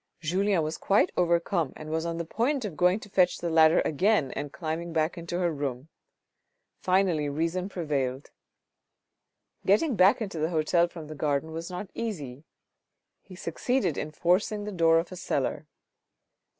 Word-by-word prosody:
Julien 185 +2 +1
was 155 +1 -4
quite 195 -2 +3
overcome 170 -3 +1
and 155 0 -8
was 160 +1 -1
on 165 0 -3
the 170 - -3
point 245 - -1
of 190 -7 -5
going 180 +5 +3
to 205 - -11
fetch 180 -2 +3
the 170 -1 -3
ladder 160 0 +5
again 170 -2 +1
and 145 -1 -5
climbing 165 +1 -4
back 160 0 +1
into 170 0 -5
her 175 -2 +1
room. 140 -1 -4 0.9
Finally 180 -6 +1
reason 165 +6 -2
prevailed. 140 -7 -3 1.3
Getting 220 +8 +3
back 190 +1 +5
into 195 -7 -4
the 155 +1 0
hotel 170 +1 +2
from 165 -2 -9
the 155 - -8
garden 150 +1 -1
was 165 +2 -5
not 180 +2 -6
easy. 150 - -5 0.8
He 185 - -13
succeeded 180 - -1
in 150 - -3
forcing 180 +6 +1
the 210 - -5
door 165 -3 +4
of 165 +3 -1
a - - -6
cellar. 180 - -2
170 Hz, 165 wpm, -27 LUFS, 155-185 Hz, 1.3 s, ladder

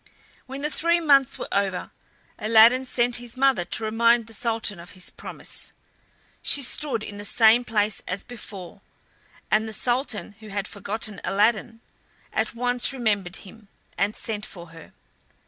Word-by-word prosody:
When 270 +2 -7
the 300 - -1
three 340 +2 +3
months 275 -4 +4
were - - -5
over, 195 -2 -1 0.5
Aladdin 230 +4 +6
sent 245 -1 +2
his 245 0 -8
mother 265 -8 +3
to 220 - -1
remind 230 +1 +3
the 225 - -12
Sultan 225 -4 -2
of 170 - -11
his 180 - -6
promise. - - -6 0.7
She 280 - +1
stood 250 -3 0
in 205 -1 -7
the - - -6
same 225 +3 +5
place 215 -2 +1
as 185 +2 -2
before, 200 -5 -9 0.7
and 215 +1 +3
the 220 - -6
Sultan, 245 -2 -1
who 220 - -12
had 200 0 -3
forgotten 210 0 -4
Aladdin, 220 +2 +1 0.5
at - - -1
once 245 +1 +3
remembered 205 -8 -1
him, 210 +2 -14 0.3
and 205 +2 0
sent 210 -2 -3
for 175 -4 -9
her. 165 0 -14
225 Hz, 155 wpm, -25 LUFS, 205-245 Hz, 0.7 s, Aladdin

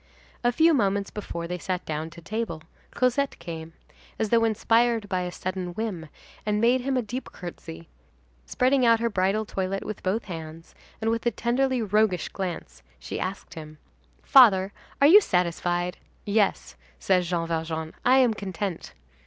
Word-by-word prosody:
A 240 - +3
few 325 +6 +4
moments 200 -6 +1
before 170 -5 -5
they 180 +1 -4
sat 180 +1 -3
down 155 +1 -3
to 170 +1 -13
table, 190 -4 -4 0.3
Cosette 255 +2 +1
came, 165 -1 -8 0.4
as 220 - -1
though 230 -1 +4
inspired 225 0 +2
by 185 -2 -1
a 180 0 -3
sudden 185 -1 -5
whim, 190 -8 -4 0.3
and 210 0 0
made 245 +3 +3
him 265 +1 -1
a 250 - 0
deep 245 +5 -6
courtesy, 85 - -9 0.6
spreading 260 +1 +2
out 230 -1 +5
her 235 0 0
bridal 195 +3 +1
toilet 195 -1 -3
with 215 - -6
both 200 +5 -1
hands, 165 -2 -8 0.3
and 225 +1 +1
with 230 0 -1
a - - +6
tenderly 245 +2 0
roguish 210 -4 +1
glance, 185 - -6 0.2
she 65 - -6
asked 190 +2 -5
him: 155 -1 -10 0.5
"Father, 200 -8 +6 0.3
are 280 - +5
you 400 +7 +9
satisfied?" 175 - 0 0.3
"Yes," 205 -1 0 0.2
said 185 -2 +2
Jean 170 -1 -2
Valjean, 160 -1 -3
"I 255 +2 +5
am 250 -4 +4
content!" 195 -3 -5
195 Hz, 160 wpm, -26 LUFS, 175-230 Hz, 0.6 s, you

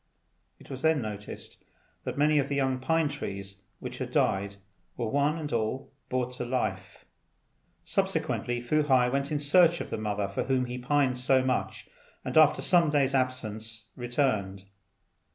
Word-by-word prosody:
It - - -14
was 130 -1 -6
then 160 -1 +3
noticed 105 -3 -7 0.4
that - - -4
many 150 +1 +4
of 140 - -1
the 140 - -1
young 130 -2 0
pine 160 +4 +1
trees 100 -8 -6 0.2
which - - -7
had - - -3
died 100 +1 +1 0.4
were 120 - -2
one 145 +5 +1
and 150 -4 -5
all 115 +3 -2 0.2
brought 125 0 -1
to - - -3
life. 100 -7 -3 0.8
Subsequently, 120 0 -1
Fu 155 +5 +2
hai 130 -4 +3
went 140 +2 -1
in 150 - +1
search 170 +3 +4
of - - -6
the - - -2
mother 105 -2 -1
for 100 - -3
whom 130 -1 +1
he 125 0 -5
pined 130 -1 +1
so 130 +1 +3
much, 130 -1 -2 0.4
and - - -4
after 155 -2 +5
some 175 -4 +4
days' 140 -2 +2
absence 115 -4 -2
returned. 120 -7 -1
130 Hz, 165 wpm, -28 LUFS, 110-145 Hz, 0.8 s, after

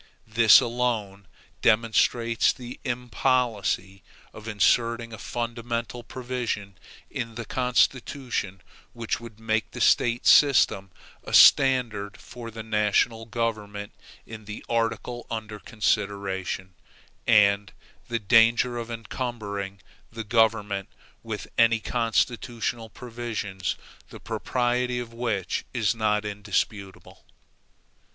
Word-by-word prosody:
This 110 0 +7
alone 115 -6 -2 0.3
demonstrates 115 +1 +3
the 125 0 -9
impolicy 120 -5 -1 0.3
of 110 +1 -11
inserting 115 +2 +1
a 110 - -8
fundamental 120 0 -4
provision 120 -6 -4 0.4
in 115 -1 -5
the 115 0 -5
Constitution 125 -5 0 0.3
which 115 -1 -3
would 115 -2 -12
make 110 -1 -1
the - - -9
State 120 0 +3
systems 125 -9 +5 0.3
a - - -1
standard 115 -7 +5
for 120 -1 -10
the 110 0 -8
national 110 +1 +1
government 105 -4 -3 0.3
in 110 -1 -10
the 105 +1 -8
article 115 +1 -2
under 110 -2 -5
consideration, 100 -4 -2 0.5
and 100 -2 +4 0.4
the 120 - -1
danger 115 +3 +4
of 115 0 -6
encumbering 110 -4 -5 0.3
the 115 0 -6
government 105 -3 +1 0.3
with - - -5
any 115 0 +5
constitutional 115 0 -1
provisions 115 -6 -4 0.3
the - - -11
propriety 125 0 -1
of 120 -1 -5
which 115 -6 -2
is 120 0 +2
not 105 -2 0
indisputable. 100 -1 -4
115 Hz, 100 wpm, -26 LUFS, 105-120 Hz, 0.5 s, This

